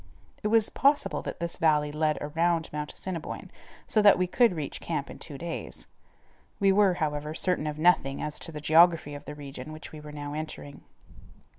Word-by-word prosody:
It - - -1
was 220 0 +3
possible 275 - +2
that - - -6
this 170 -1 -2
valley 150 -2 +2
led 155 0 0
around 165 +2 0
Mount 150 0 -4
Assiniboine 175 -4 -6 0.3
so 215 - +2
that 205 -1 +7
we 185 - +2
could 230 +2 +3
reach 150 -3 -4
camp 155 -4 -3
in - - -11
two 145 -4 -6
days. 170 +3 -6 0.7
We 195 -2 +4
were, 195 -2 +4
however, 150 -1 -2
certain 180 -4 +1
of 150 0 -4
nothing 155 -5 +3
as 150 0 -3
to - - -7
the 150 -1 -7
geography 160 -1 +5
of 145 - -9
the 150 - -7
region 140 -1 -8
which 155 +1 -9
we 155 - -9
were 150 0 -10
now 145 -1 -6
entering. 155 -2 -7
155 Hz, 190 wpm, -28 LUFS, 150-180 Hz, 0.7 s, that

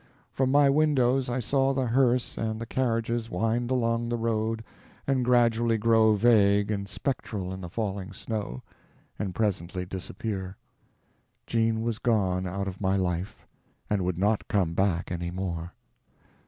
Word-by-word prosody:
From 130 -1 +1
my 145 +1 +5
windows 135 -3 +3
I 120 +1 -1
saw 135 +3 +1
the 130 -1 +1
hearse 125 0 +2
and 110 -1 -2
the 115 - -4
carriages 115 -2 -1
wind 115 +6 0
along 115 -2 0
the 120 - 0
road 115 0 -1 0.4
and 135 -2 +1
gradually 120 -2 +3
grow 110 0 +4
vague 105 -2 +4
and 100 -1 -3
spectral 100 -3 -3
in 95 - -7
the 90 - -6
falling 100 -1 -3
snow, 105 - -5 0.6
and 95 -4 -3
presently 95 -4 -1
disappear. 95 +1 -5 0.9
Jean 115 -1 +1
was 115 -1 -2
gone 95 -6 +1
out 100 +2 -3
of 95 0 -6
my 95 0 +2
life, 90 0 -3 0.5
and 100 -3 +1
would 90 -2 -1
not 105 +3 +1
come 90 -5 +1
back 90 -2 0
any 85 0 -3
more. 85 -2 -4
110 Hz, 150 wpm, -27 LUFS, 95-120 Hz, 0.9 s, my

